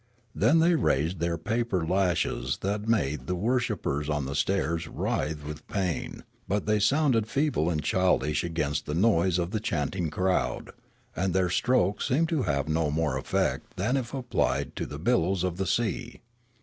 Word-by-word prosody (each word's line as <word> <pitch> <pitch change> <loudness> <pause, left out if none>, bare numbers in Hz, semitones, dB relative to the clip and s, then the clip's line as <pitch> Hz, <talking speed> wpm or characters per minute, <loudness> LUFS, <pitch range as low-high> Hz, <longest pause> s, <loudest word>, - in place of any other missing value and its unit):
Then 120 +10 +3
they 165 +2 +4
raised 80 - +1
their 85 0 0
paper 110 0 -1
lashes 90 0 0
that 100 - 0
had 105 +2 -3
made 75 - 0
the 90 - 0
wor 120 +8 +1
shippers 75 - -2
on 75 -2 -1
the 70 - -4
stairs 80 +1 0
writhe 75 -1 -2
with 75 -1 -8
pain; 95 -5 -3 0.2
but 100 +1 -1
they 105 0 +2
sounded 120 0 +2
feeble 135 - +1
and 80 -3 -1
childish 90 -6 +1
against 75 -4 -2
the 75 - -2
noise 95 -2 +3
of 85 0 -1
the 110 - -1
chanting 85 -2 -2
crowd; 95 +4 -1 0.4
and 95 0 -1
their 90 -2 +2
strokes 105 -2 +1
seemed 155 +5 +2
to 160 -5 +1
have 70 0 0
no 80 0 +1
more 75 -2 0
effect 65 - -1
than 110 +8 +1
if 125 -3 -2
applied 130 -3 -1
to - - -3
the - - -7
billows 90 +2 +1
of 90 -2 -1
the 95 0 -1
sea. 120 +1 -1
90 Hz, 175 wpm, -27 LUFS, 80-115 Hz, 0.4 s, they